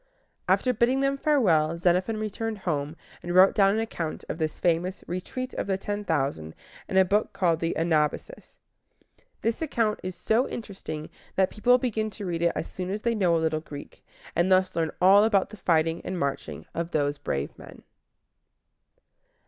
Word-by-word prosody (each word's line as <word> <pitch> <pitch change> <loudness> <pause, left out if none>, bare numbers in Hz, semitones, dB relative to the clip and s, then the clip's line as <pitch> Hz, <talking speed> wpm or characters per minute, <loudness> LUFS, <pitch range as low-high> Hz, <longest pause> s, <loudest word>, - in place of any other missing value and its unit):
After 255 - +3
bidding 250 +4 +2
them 275 0 +2
farewell, 180 - +2
Xenophon 180 +5 +1
returned 215 +1 -3
home, 155 -5 -2 0.3
and 175 0 -4
wrote 190 +1 +7
down 195 -1 +4
an - - 0
account 175 -8 -4
of - - -4
this 155 -1 -2
famous 175 +2 0
Retreat 255 +9 -5
of - - -3
the 190 -1 0
Ten 205 +1 -4
Thousand 135 - -2 0.3
in 190 - 0
a 190 - +6
book 205 +3 +1
called 175 -4 +1
the 165 0 -1
A 165 - +1
nab´a 155 -3 +2
sis. - - -16 0.9
This 230 +5 0
account 230 -9 0
is 185 0 -5
so 225 +8 +1
interesting 190 -9 -6 0.3
that 190 -1 +2
people 245 +3 +4
begin 220 -4 -1
to 205 0 -8
read 170 -2 -2
it 170 0 +2
as - - -3
soon 180 0 -5
as 205 +2 -3
they 235 - +2
know 185 -6 +2
a 165 - +1
little 155 -1 0
Greek, 145 -2 -10 0.3
and 175 +2 +2
thus 185 0 +3
learn 165 -1 +1
all 195 +3 +7
about 205 -3 +2
the 215 - -10
fighting 165 -2 +1
and 185 - -4
marching 140 -4 -3
of 170 0 -3
those 145 -3 0
brave 70 +1 -3
men. - - -13
185 Hz, 185 wpm, -26 LUFS, 165-215 Hz, 0.9 s, wrote